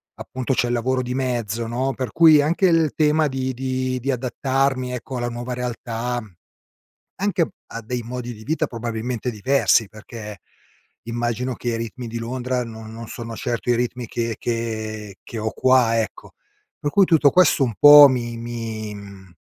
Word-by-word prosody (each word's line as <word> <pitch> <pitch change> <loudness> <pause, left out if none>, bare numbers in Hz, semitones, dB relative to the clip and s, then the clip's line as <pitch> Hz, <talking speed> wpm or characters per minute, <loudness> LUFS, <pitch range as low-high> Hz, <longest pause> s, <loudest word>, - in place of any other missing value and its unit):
appunto, 130 +1 -3
c'è 120 - +1
il 120 - -1
lavoro 130 +2 0
di 125 0 -4
mezzo, 120 -4 -2
no, 130 +4 -1
per 130 -2 -4
cui 160 -3 +7
anche 165 +6 +1
il 165 -4 +2
tema 155 0 +3
di 130 -1 -2
di 130 0 -2
di 135 +3 -1
adattarmi, 130 0 -1
ecco, 125 +1 -5
alla 120 0 -2
nuova 120 +1 -5
realtà, 120 0 -3 1.0
anche 190 -4 0 0.2
a 115 - -7
dei 120 +2 -4
modi 120 +1 -6
di 110 -1 -12
vita 160 +4 0
probabilmente 115 +1 -4
diversi 115 0 +2
perché, 105 -1 -10 0.6
immagino 120 +2 -2
che 120 - -4
i 115 - -1
ritmi 115 +2 -6
di 115 +1 -5
Londra 125 +1 -2
no 110 -1 -9
non 115 +1 -9
sono 115 +1 -7
certo 120 0 -3
i - - +3
ritmi 120 0 -2
che 115 0 -2
che 110 -3 -4
che 115 - -8
ho 110 0 -2
qua, 125 -3 +3
ecco. 110 - -8 0.5
Per 145 - -1
cui, 200 +3 +5
tutto 160 -5 +5
questo 180 -6 +4
un 120 -3 0
po' 145 0 +11
mi 120 -2 -2
mi 115 -2 -5
mhmm, 100 -3 -12
120 Hz, 175 wpm, -22 LUFS, 115-130 Hz, 1.0 s, po